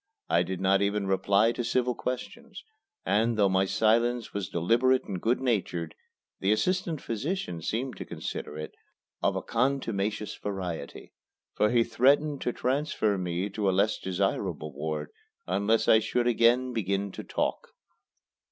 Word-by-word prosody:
I - - +4
did 95 -1 -3
not 95 +1 +3
even 100 0 0
reply 100 +3 +3
to 120 - -3
civil 125 +1 +1
questions; 200 - -6 0.4
and, 110 +4 +2
though 100 -2 +4
my 95 0 +3
silence 115 +3 +1
was 100 -4 -3
deliberate 120 +9 +2
and 95 -3 -5
good 120 +3 +1
natured, 95 -10 -1 0.5
the 95 - +1
assistant 170 - 0
physician 115 - -3
seemed 125 +9 -3
to - - -6
consider 75 - -6
it 75 - -6 0.5
of - - +1
a - - -3
contumacious 115 -5 -1
variety, 90 -7 -5 0.4
for 105 - +2
he 120 0 +4
threatened 140 +5 +2
to 125 - 0
transfer 130 -5 0
me 90 0 -2
to 100 -1 0
a 95 - +1
less 105 +2 +2
desirable 90 -5 -2
ward 75 +1 -4 0.3
unless 100 +5 +1
I 110 - +7
should 120 +2 0
again 120 +2 +3
begin 100 -2 -1
to - - -7
talk. - - -2
105 Hz, 150 wpm, -28 LUFS, 95-125 Hz, 0.5 s, I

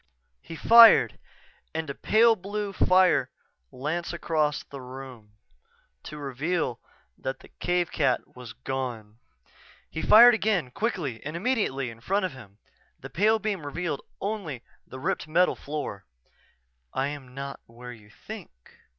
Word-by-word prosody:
He 165 - -9
fired 230 +6 +7 0.6
and 160 -4 -4
pale 225 +1 +5
blue 205 +1 -5
fire 185 -1 +3 0.4
lanced 160 +7 -3
across 155 -3 -1
the 140 -1 -10
room, 125 -4 -10 0.7
to 150 - -8
reveal 145 0 -2 0.4
that 130 0 -5
the - - -16
cave 175 -1 0
cat 145 - 0
was 125 -3 -10
gone. 120 -3 -5 0.7
He 160 - -4
fired 240 +3 +8
again, 200 - 0
quickly 155 - -3
and 155 +3 -5
immediately 170 - -1
in 115 0 -15
front 195 - 0
of 185 - -3
him. 105 -7 -14 0.4
The - - -10
pale 215 +5 +3
beam 210 -6 -3
revealed 150 +1 -3 0.2
only 190 - -4 0.2
the 130 - -9
ripped 145 - -2
metal 175 +4 +3
floor. 145 -10 -6 0.9
"_I 135 +1 0
am 135 -3 -9
not 140 0 -6
where 125 +1 -10
you 105 -3 -17
think. - - -10
150 Hz, 135 wpm, -26 LUFS, 130-185 Hz, 0.9 s, fired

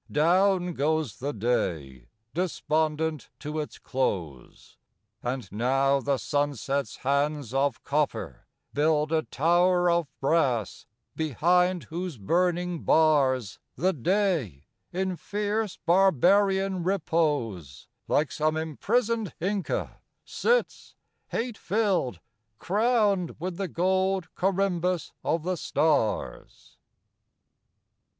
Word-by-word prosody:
Down 180 +3 +3
goes 155 -4 -1
the 140 +3 -2
day 80 - -2 0.3
despondent 155 -3 -1
to 150 +1 -5
its 150 - -5
close: 90 - -4 0.4
And 125 -2 -3
now 135 +6 +2
the 140 0 0
sunset's 140 -1 -1
hands 140 -2 0
of 135 -2 0
copper 150 0 -2 0.3
build 150 +1 +2
A 160 -1 +2
tower 175 +4 +2
of 170 -2 +1
brass, 135 - 0 0.3
behind 175 +4 +2
whose 175 -2 -5
burning 175 - 0
bars, 135 -8 +2 0.2
The 185 +7 +1
Day, 155 - 0 0.3
in 185 0 -2
fierce, 210 +1 -2
barbarian 190 +2 +3
repose, 145 - -1 0.2
Like 150 -1 +1
some 155 +1 0
imprisoned 215 - -1
Inca 195 +2 -2 0.3
sits, 485 +1 -1 0.3
hate 235 -1 -3
filled, 185 - 0 0.4
Crowned 205 - +1
with 175 +1 -4
the 195 - -2
gold 190 +1 0
corymbus 185 -3 0
of 165 -1 0
the 180 +1 -1
stars. 150 -9 -1
160 Hz, 95 wpm, -27 LUFS, 140-185 Hz, 0.4 s, Down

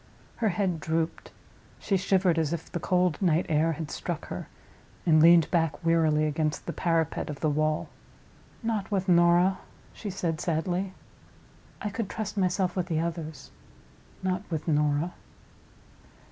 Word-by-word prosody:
Her 225 -2 +1
head 180 -2 0
drooped. 160 +1 -2 0.5
She 195 - -1
shivered 185 -2 +2
as 160 0 0
if 165 -1 -6
the 175 - -2
cold 180 -1 +1
night 175 -2 +3
air 160 +1 +2
had 155 0 -6
struck - - -4
her, - - -5 0.6
and 155 -2 +5
leaned 165 -1 +6
back 165 0 0
wearily 160 -2 +3
against 155 0 -1
the - - -4
parapet 165 -3 0
of 150 - -6
the 155 - +2
wall. 155 +1 0 0.8
"Not 220 -3 -1
with 195 -2 -1
Norah," 175 +1 +4 0.3
she 210 - -6
said, 170 -4 -2
sadly. 180 +3 -1 0.9
"I 210 - -2
could 200 0 -3
trust 210 -2 -4
myself 185 -2 +1
with 180 -2 -1
the 160 -3 0
others. 160 -4 -4 0.7
Not 185 0 0
with 160 -2 -3
Norah." 150 +2 +1
170 Hz, 145 wpm, -28 LUFS, 155-185 Hz, 0.9 s, leaned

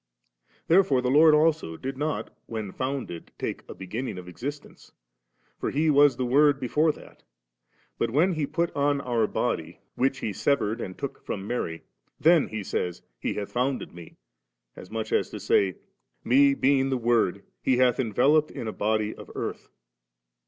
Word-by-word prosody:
* - - -38
Therefore 165 -6 +4
the 125 - +1
Lord 155 +2 +7
also 150 - +1
did 135 +7 -5
not 150 +2 -3
when 110 -4 -5
founded 130 -10 -4
take - - -4
a - - -7
begin 110 +7 -5
ning 110 - -5
of 90 -1 -9
existence; 140 - -8 0.7
for - - -1
He 155 +2 +2
was 145 -1 +5
the 130 - -1
Word 140 +2 +4
before 150 +5 +2
that; - - -16 0.8
but 115 - +1
when 155 +10 +3
He 155 -3 -1
put 170 +2 -1
on 145 0 +2
our 120 -5 0
body, - - -2 0.2
which 135 +1 +1
He 105 - -3
severed 115 -1 0
and 95 - -6
took 140 - -6
from 95 -1 -5
Mary, 85 -8 -3 0.4
then 165 -1 +5
He 110 -2 -5
says 90 -2 -3
' - - -51
He - - -2
hath 100 -1 -4
founded 125 +2 -1
me 85 -1 -12 0.3
;' - - -56
as 90 - -11
much 110 0 -4
as - - +1
to - - -7
say, 95 -3 +2 0.3
' - - -49
Me, 140 +1 +6
being 135 0 +2
the 130 - 0
Word, 120 -5 +1 0.2
He 130 - +2
hath 125 -1 +3
enveloped 135 +6 +3
in 115 - -6
a 110 - -3
body 110 0 0
of - - -12
earth. - - -5
130 Hz, 185 wpm, -26 LUFS, 105-145 Hz, 0.8 s, Lord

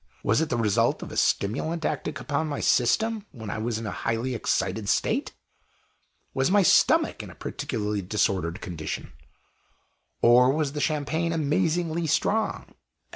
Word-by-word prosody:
Was 110 +7 +2
it 160 - -1
the 120 - 0
result 115 +1 +1
of - - -8
a - - -7
stimulant 155 +11 0
acting 155 0 -2
upon 150 +2 -2
my 145 -2 -3
system 215 - +1
when 110 -5 -7
I - - -3
was 115 0 -2
in 115 - -5
a 105 - -3
highly 115 +3 -2
excited 105 -2 -1
state? - - 0 1.0
Was 135 +3 +1
my 200 +1 +4
stomach - - +4
in - - -9
a - - -12
particularly 105 -1 -3
disordered 90 -3 -1
condition? 80 -3 -6 1.1
Or 125 +2 +6
was 150 -2 0
the 150 0 -4
Champagne 160 +3 0
amazingly 165 +1 0
strong? 215 +8 0
130 Hz, 150 wpm, -26 LUFS, 110-160 Hz, 1.1 s, Or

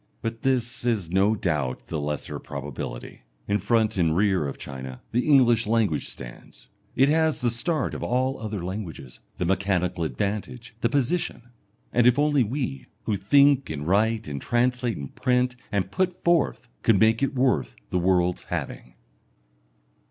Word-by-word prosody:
But 115 0 -4
this 125 -3 0
is 110 -9 0
no 100 +4 +3
doubt 75 -10 -2
the 80 -3 -3
lesser 75 0 -4
probability. 70 -4 -7 0.3
In 100 +1 +1
front 110 +1 +1
and 80 -2 +2
rear 95 -6 +2
of 70 - -6
China 65 -2 -7
the 125 +4 0
English 120 -6 +5
language 110 -8 +1
stands. - - -11 0.3
It 135 - +5
has 160 -1 +2
the 120 -1 +1
start 150 +5 -1
of - - -5
all 130 +2 0
other 105 -5 -4
languages 85 - -6 0.2
the 90 - -1
mechanical 90 -2 0
advantage 105 +7 -3
the 115 - +2
position. 135 -2 -1 0.4
And 120 0 +4
if 125 - +5
only 145 -2 +3
we, 115 - -3 0.2
who 105 - 0
think 140 +7 +4
and 75 -1 -4
write 110 +4 +2
and 70 -2 -5
translate 120 0 0
and 70 -1 -7
print 125 -1 +1 0.2
and 100 -2 -1
put 185 -1 -1
forth, 170 -3 +2
could 110 -4 +4
make 110 +3 +4
it 140 0 0
worth 130 0 +1 0.2
the 90 - +1
world's 90 0 +1
having! - - -5
110 Hz, 160 wpm, -25 LUFS, 90-125 Hz, 0.4 s, English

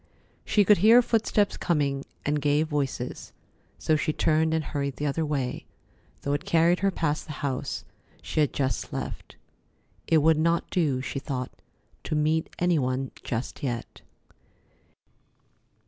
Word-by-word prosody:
She 205 -2 +3
could 205 -1 +6
hear 230 +6 +7
footsteps 220 -3 +1
coming, 140 -4 0 0.2
and 145 0 0
gay 145 +1 +3
voices, 140 -5 -3 0.4
so 155 - +1
she 155 +1 0
turned 160 +1 +2
and 160 -1 +1
hurried 140 -2 -3
the 150 - -3
other 150 +3 0
way, 140 -5 -2 0.6
though 140 - 0
it 145 - -1
carried 170 +2 +3
her 195 - +2
past 155 -5 -1
the 155 - -5
house 130 -2 -3 0.3
she - - -3
had 150 -3 +3
just 130 -7 -2
left. - - -6 0.7
It 165 - +4
would 160 -1 +4
not 170 +1 +1
do, 145 -8 +1
she 135 - -4
thought, 130 -2 -4 0.5
to - - -1
meet 155 +1 +1
any 175 -2 +2
one 130 0 -1
just 120 +5 -4
yet. 120 -5 -4
150 Hz, 145 wpm, -27 LUFS, 140-165 Hz, 0.7 s, hear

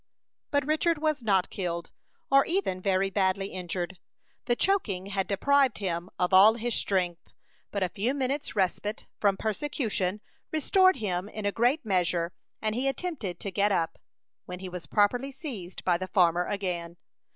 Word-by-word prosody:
But 285 -2 +1
Richard 315 +2 +2
was 305 -2 0
not 195 -5 +2
killed, 170 -3 -3 0.4
or 275 0 +7
even 335 - -1
very 195 0 +1
badly 195 0 +1
injured. 180 0 -4 0.5
The 240 - +2
choking 230 - +1
had 195 -1 -2
deprived 275 +5 +3
him 175 -2 -3
of 180 +1 0
all 205 +4 +8
his 240 0 -2
strength; 180 -5 0 0.5
but 200 -2 -1
a 180 - 0
few 230 +10 -1
minutes' 280 0 -2
respite 205 +2 -1
from 200 -2 +2
persecution 215 -4 -1 0.3
restored 370 +4 +4
him 200 -5 -2
in 215 -1 -6
a 205 - +2
great 245 +6 +1
measure, 175 -3 +1 0.3
and 215 -1 +1
he 255 +4 -1
attempted 270 - -3
to 200 - -3
get 200 +3 +2
up, 165 -4 0 0.5
when 180 - -6
he 185 0 -7
was 175 -4 -7
promptly 245 - +2
seized 250 - -7
by 175 -2 +2
the 185 - -4
farmer 175 -2 +3
again. 175 -4 -3
200 Hz, 160 wpm, -28 LUFS, 180-255 Hz, 0.5 s, all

